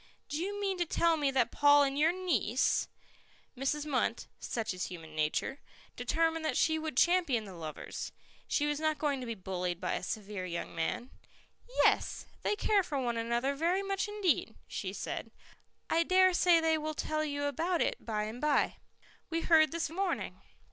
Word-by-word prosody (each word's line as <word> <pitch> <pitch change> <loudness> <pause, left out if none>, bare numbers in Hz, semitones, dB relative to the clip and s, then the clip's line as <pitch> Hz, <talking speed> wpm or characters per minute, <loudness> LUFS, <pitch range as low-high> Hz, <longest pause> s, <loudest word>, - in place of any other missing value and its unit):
"Do 295 - -2
you 405 +3 -3
mean 390 -2 -1
to 350 - +2
tell 335 +1 +3
me 290 -3 +1
that 260 -3 +2
Paul 290 0 +6
and 275 -1 0
your 310 +3 +4
niece 300 - +1 0.3
" - - -32
Mrs. 275 +3 -1
Munt 285 -4 0
such 225 -4 -3
is 185 - -3
human 160 -3 -9
nature 155 - -1 0.4
determined 325 0 0
that 315 - 0
she 315 -1 +3
would 310 -5 -4
champion 340 -11 +3
the 195 - -9
lovers. 160 -3 -6 0.4
She 295 - +1
was 295 0 0
not 310 -1 +1
going 285 -3 0
to 250 - -6
be 230 - -3
bullied 180 -2 -3
by 180 - -1
a - - -2
severe 200 -1 -4
young 170 -1 -4
man. 165 +10 -2 0.7
"Yes, - - +2 0.2
they 420 - +1
care 415 -1 +3
for 300 -6 -3
one 240 -2 -1
another 235 +4 0
very 345 +7 +1
much 390 +1 -1
indeed," 415 -5 0
she - - -4
said. - - -5 0.6
"I 330 - +3
dare 370 +2 +5
say 345 -1 +5
they 320 -1 +2
will 310 0 -3
tell 310 +1 -1
you 285 -1 -2
about 330 +5 0
it - - 0
by 215 -2 -1
and 220 +3 -6
by. 300 -2 +2 0.5
We 330 0 -1
heard 315 -2 +5
this 335 0 -1
morning." 375 +3 -2
295 Hz, 185 wpm, -32 LUFS, 230-335 Hz, 0.7 s, Paul